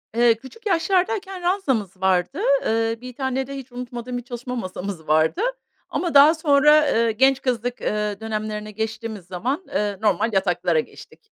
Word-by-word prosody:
Eee, 235 0 +5
küçük 265 - -15
yaşlardayken 380 +1 0
ranzamız 265 - 0
vardı. 190 - +1 0.3
Eee, 225 0 +1
1 250 0 -8
tane 265 0 -2
de 275 - -6
hiç 265 -2 -9
unutmadığım 245 0 -6
bir 245 - -6
çalışma 245 +1 -6
masamız 185 -6 -5
vardı 155 - +2 0.5
ama 345 -3 -2
daha 285 +3 +8
sonra, 300 -1 +5
eee, 230 0 +2
genç 265 +4 +3
kızlık, 245 -1 -2
eee, 210 -1 -1
dönemlerine 215 -1 -4
geçtiğimiz 220 -2 -5
zaman, 245 - -3
eee, 205 -1 -1
normal 215 +2 +1
yataklara 175 -4 +1
geçtik. 435 - -10
240 Hz, 155 wpm, -22 LUFS, 210-275 Hz, 0.5 s, daha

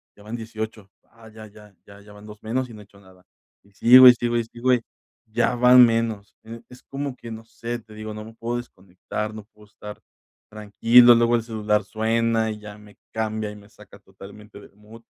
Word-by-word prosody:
"Ya - - -20
van 110 +3 -7
18 110 -3 -8 0.2
ah, 115 -1 -17
ya 110 0 -13
ya 105 -1 -18
ya 100 0 -15
ya 105 0 -17
van 105 0 -15
2 105 0 -14
menos 125 +3 -3
y - - -12
no 105 - -12
he - - -13
hecho 100 0 -22
nada", 95 -1 -22 0.4
y 100 - -26
sigo, 125 +5 +8
y 125 - +10
sigo, 120 0 -2
y 115 - 0
sigo 120 +3 -1
y 125 - +1 0.5
ya 110 - 0
van 125 +1 +7
menos, 115 -3 -2 0.4
es 125 - -15
como 140 -1 -6
que 120 - -12
no 110 0 -10
sé, 115 +1 -7
te 110 -1 -18
digo, 110 0 -8
no 105 0 -9
me 110 - -13
puedo 120 +1 -4
desconectar, 100 -1 -7
no 110 -1 -10
puedo 105 0 -20
estar 105 0 -12 0.5
tranquilo. 115 +3 +4
Luego 120 0 +2
el 115 - -1
celular 105 -2 -1
suena 115 +2 -1
y 105 - -7
ya 105 -1 -12
me 105 -1 -18 0.2
cambia 110 -1 -3
y - - -12
me 105 0 -17
saca 105 0 -18
totalmente 100 +2 -15
del - - -19
mood. 110 +2 -17
110 Hz, 215 wpm, -22 LUFS, 105-115 Hz, 0.5 s, y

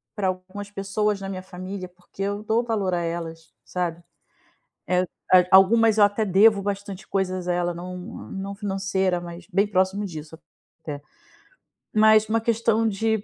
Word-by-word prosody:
pra 200 -3 0
algumas 185 +2 -5
pessoas 200 +1 -1
da 195 - -6
minha 185 -1 -5
família, 185 0 -7
porque 180 +2 -13
eu 205 +1 -2
dou 225 +2 +1
valor 205 -6 -1
a 175 - 0
elas, 165 -1 -5
sabe. 175 -2 -3 0.9
Eh, 180 +1 +2 0.3
a 185 -1 +9
algumas 220 +3 +6
eu 205 - +8
até 205 +2 +1
devo 200 +1 +5
bastante 200 -1 -5
coisas 185 -2 -1
a - - +2
ela, 175 0 0
não 180 +1 -7 0.3
não 195 +1 -5
financeira, 190 -3 -1
mas 175 0 -9
bem 195 +3 +3
próximo 195 +1 +1
disso 160 -3 -8 0.4
até. 145 -2 -6 0.9
Mas 215 0 +6
uma 225 +1 +1
questão 225 0 +1
de 220 0 0
195 Hz, 160 wpm, -24 LUFS, 180-210 Hz, 0.9 s, a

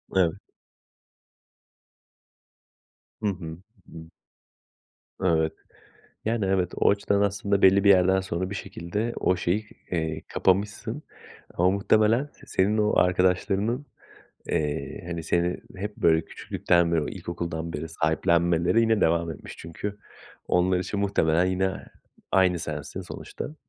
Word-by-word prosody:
Evet. 90 -4 +4 2.9
Hı 105 - 0
hı, 85 -4 -6 0.3
hı. 80 0 -10 1.1
Evet. 80 -3 +2 0.7
Yani, 110 -2 0
evet, 95 -2 +1
o - - +3
açıdan, 100 0 +1
aslında 100 0 +1
belli 95 +1 +6
bir 100 - +5
yerden 95 0 +5
sonra, 95 0 -3
bir 100 - -5
şekilde 105 +6 -4
o 90 - +2
şeyi, 100 +5 -1 0.2
eee, 80 -2 -2
kapamışsın, 100 +2 0 0.5
ama 90 +2 +3
muhtemelen 110 +5 +3
s - - -18
senin 100 +3 +1
o 105 0 +2
arkadaşlarının, 95 +8 +1 0.6
eee, 75 -2 -2
hani, 85 -1 -4
seni 85 +2 0 0.2
hep 105 +2 -5
böyle 80 0 +3
küçüklükten 85 -1 0
beri, 80 -2 +2
o - - -4
ilkokuldan 85 -1 -5
beri 80 +1 -4
sahiplenmeleri 85 +4 +2
yine 110 -2 +2
devam 85 0 +2
etmiş. 80 - -9
Çünkü, 100 +5 -6 0.5
onlar 90 +1 +3
için, 95 +3 -3
muhtemelen, 85 -4 +2
yine 95 +1 -1 0.5
aynı 95 -2 +3
sensin 75 -3 -5
sonuçta. 150 - -7
90 Hz, 120 wpm, -26 LUFS, 85-100 Hz, 2.9 s, belli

